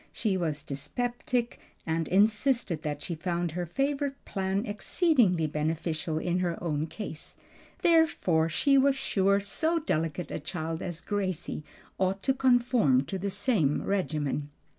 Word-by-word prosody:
She 210 -4 0
was 155 -5 -2
dyspeptic, 240 - -2 0.3
and 160 -1 -1
insisted 210 - +2
that 150 -1 -4
she 175 - -3
found 170 +1 -2
her 175 +2 -3
favorite 275 - -1
plan 195 +2 -1
exceedingly 210 - +2
beneficial 155 +1 -2
in 175 +2 0
her 175 -2 -1
own 155 -2 -1
case; 165 -4 -7 0.5
therefore 305 - +3
she 275 - +4
was 275 0 +4
sure 200 -6 +2
so 315 +12 0
delicate 170 - -2
a - - -3
child 160 0 -4
as 175 -2 -4
Gracie 185 -6 -2 0.4
ought 190 +1 0
to 265 - +3
conform 245 - +3
to 190 +6 -4
the 200 +2 -2
same 195 - +1
regimen. 150 -7 -1
185 Hz, 140 wpm, -29 LUFS, 160-240 Hz, 0.5 s, she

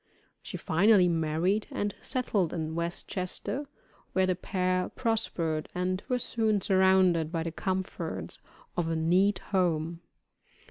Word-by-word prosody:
She - - -6
finally 190 +2 +4
married, 165 +5 +1
and 205 -1 -2
settled 205 -9 0
in 160 -2 -3
West 170 +1 -3
Chester, 200 +9 -3 0.5
where 190 0 +3
the 185 -1 +1
pair 185 0 0
prospered 170 -9 -1
and 185 +1 -1
were 250 - +2
soon 220 -3 +1
surrounded 185 -4 +3
by 165 -2 -1
the 165 - -3
comforts 190 +2 -3 0.4
of 175 -2 0
a 165 - 0
neat 180 +5 +3 0.2
home. 170 -2 +1
185 Hz, 130 wpm, -29 LUFS, 165-195 Hz, 0.5 s, finally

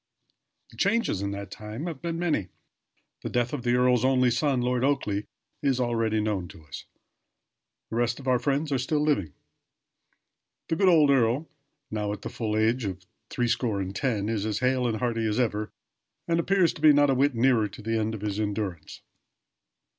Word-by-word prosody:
The - - -17
changes 200 - +1
in 100 - -2
that 100 0 -6
time 110 +7 -7
have 165 -6 -5
been 170 -1 -3
many. 160 - 0 0.7
The - - -4
death 120 +1 0
of 145 - -2
the 120 0 +1
earl's 125 -1 +3
only 130 -1 +3
son, 135 +1 +1
Lord 125 0 0
Oakleigh, 110 -7 0 0.4
is 135 -3 +1
already 115 -3 +1
known 105 -4 -1
to 80 - -14
us. 70 - -9 1.1
The 115 - -2
rest 120 +1 0
of 135 - -10
our 125 -1 +3
friends 145 +4 -1
are 135 - +1
still 150 +4 0
living. 100 - 0 1.4
The 160 - +1
good 195 +2 +4
old 155 -5 +5
earl, 130 +4 +2 0.4
now 105 -1 -2
at 105 - -9
the - - -4
full 110 -2 -2
age 115 +3 +2
of 95 -2 -5 0.2
three 120 -1 -1
score 115 -3 0
and 95 0 -4
ten, 105 -4 -1
is 110 -2 -1
as 105 -1 -1
hale 125 0 +1
and 110 -2 -1
hearty 115 -1 -1
as 105 +3 0
ever, 110 -3 0 0.6
and 170 0 +1
appears 185 0 +2
to - - -12
be 155 -1 +7
not 145 -1 +4
a - - +3
whit 135 0 +2
nearer 115 -2 +3
to 100 - -12
the 115 +1 0
end 110 +1 -1
of 105 - -8
his 105 -1 -3
endurance. 100 -5 -4
120 Hz, 195 wpm, -27 LUFS, 105-135 Hz, 1.4 s, be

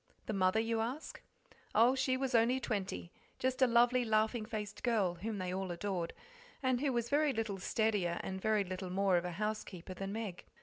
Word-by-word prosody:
The 220 - -2
mother? 185 +2 +3
you 225 0 0
ask. 255 +8 -4 0.5
Oh, 235 +4 +6
she 260 -1 +1
was 265 -1 -2
only 235 +3 +4
twenty 195 -7 -3 0.3
just 260 0 -1
a 260 - +7
lovely, 245 +1 +4
laughing 220 0 +1
faced 210 -2 -5
girl, 215 -7 +2
whom 205 +5 -4
they 185 -1 -3
all 190 0 -2
adored, 175 -1 -2 0.5
and 255 -1 +2
who 285 -2 +2
was 235 -2 0
very 295 +2 +3
little 220 -4 -2
steadier 195 -4 0
and 190 0 -4
very 215 -1 +2
little 185 0 -5
more 195 0 +2
of 175 - -1
a 180 - -3
housekeeper 210 -2 -4
than 195 +1 -5
Meg. 210 -4 -4
215 Hz, 190 wpm, -34 LUFS, 190-240 Hz, 0.5 s, a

